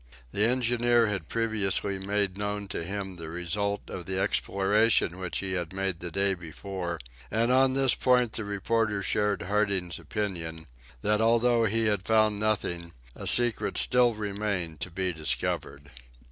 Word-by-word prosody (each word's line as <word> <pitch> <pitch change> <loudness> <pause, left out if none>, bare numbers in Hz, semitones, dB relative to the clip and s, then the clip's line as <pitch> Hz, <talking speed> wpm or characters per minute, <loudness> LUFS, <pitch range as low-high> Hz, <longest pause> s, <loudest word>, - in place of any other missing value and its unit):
The 105 - +1
engineer 120 -1 +3
had 100 -7 -2
previously 105 -3 0
made 100 -1 -1
known 105 0 -3
to 85 - -3
him 95 0 -5
the 80 -2 -7
result 100 +5 -2
of 90 -2 -7
the 95 0 -2
exploration 100 -1 +2
which 90 -2 -3
he 95 -1 -4
had 90 -2 -3
made 95 -3 -2
the 85 - -5
day 100 +3 +1
before, 90 0 -5 0.3
and 115 +3 +1
on 130 0 +4
this 135 -2 +4
point 125 -3 +2
the 110 - -2
reporter 105 +1 -1
shared 105 -3 0
Harding's 100 -3 0
opinion, 85 -6 -4 0.4
that 105 +1 +2
although 115 +1 +3
he 110 +1 +2
had 105 -3 +1
found 110 -2 +3
nothing, 85 -6 -1 0.2
a - - -5
secret 120 -2 +2
still 125 -2 +4
remained 100 -6 -3
to 90 - -4
be 90 +1 -2
discovered! 70 -2 -3
100 Hz, 155 wpm, -28 LUFS, 90-110 Hz, 0.4 s, on